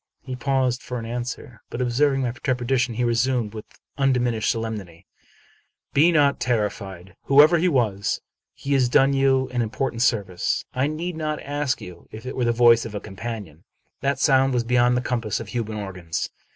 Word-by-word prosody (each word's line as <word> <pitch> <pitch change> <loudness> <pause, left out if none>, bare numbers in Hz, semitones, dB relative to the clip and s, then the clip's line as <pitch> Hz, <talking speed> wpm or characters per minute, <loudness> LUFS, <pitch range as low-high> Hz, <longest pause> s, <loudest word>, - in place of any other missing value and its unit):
" - - -56
He 130 -1 -5
paused 130 -1 0
for 125 - -5
an 115 - -5
answer; 120 -1 -6
but, 120 - -6
observing 135 +3 +2
my 120 - 0
trepidation, 125 -2 -1
he 125 - -1
resumed, 120 -2 +1
with 110 -1 -7 0.3
undiminished 125 -4 +1
solemnity, 105 -7 -4 0.5
" - - -40
Be 160 +5 +5
not 145 -3 +3
terrified. 100 -5 -3
Whoever 150 +5 +6
he 180 - +2
was, 110 - 0 0.4
he 140 - -3
has 130 -3 +3
done 135 +3 +4
you 135 -1 +2
an 120 - +1
important 115 +1 -2
service. 100 -7 0
I 130 +2 +1
need 165 +3 -4
not 155 -1 -2
ask 145 -1 -2
you 90 -1 -11
if 110 +2 -10
it 130 - -5
were 125 - 0
the 120 - +3
voice 115 0 +5
of 110 -2 -7
a - - -2
companion. 100 -6 -7 0.4
That 140 0 0
sound 135 -1 +3
was 120 - +1
beyond 125 +1 +3
the - - 0
compass 120 -4 -2
of 115 -3 -8
human 110 -3 -3
organs. 90 -5 -4
125 Hz, 185 wpm, -23 LUFS, 110-135 Hz, 0.5 s, Whoever